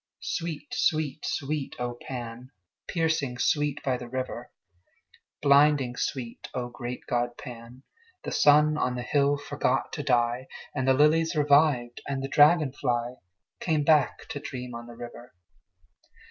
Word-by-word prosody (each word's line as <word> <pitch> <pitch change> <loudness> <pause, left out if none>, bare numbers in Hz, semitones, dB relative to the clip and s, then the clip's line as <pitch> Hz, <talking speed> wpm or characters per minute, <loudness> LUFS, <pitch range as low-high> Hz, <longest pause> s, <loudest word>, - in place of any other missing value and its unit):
Sweet, 170 - -4
sweet, 155 - 0
sweet, 145 0 -3
O 120 -1 -3
Pan! 120 -1 -6 0.4
Piercing 160 -7 0
sweet 145 +2 0
by 130 -2 0
the 125 - -8
river! 130 +1 -4 0.9
Blinding 140 -3 +4
sweet, 120 -4 -4
O 120 -1 -2
great 120 0 -6
god 120 0 -1
Pan! 120 +1 -10 0.4
The - - -4
sun 150 +1 +5
on 125 0 0
the 125 - -4
hill 145 +2 +2
forgot 140 -2 -1
to 150 - -3
die, 125 -2 +1 0.3
And 130 -2 -2
the 130 - +5
lilies 160 +4 +3
revived, 145 -5 +3
and 135 -1 -2
the - - -2
dragon 150 0 +5
fly 120 -2 -2 0.4
Came 155 -4 +1
back 150 -1 +2
to 145 - -4
dream 125 -3 -7
on 120 0 -8
the 120 - -11
river. 120 +1 -10
135 Hz, 145 wpm, -27 LUFS, 125-150 Hz, 0.9 s, sun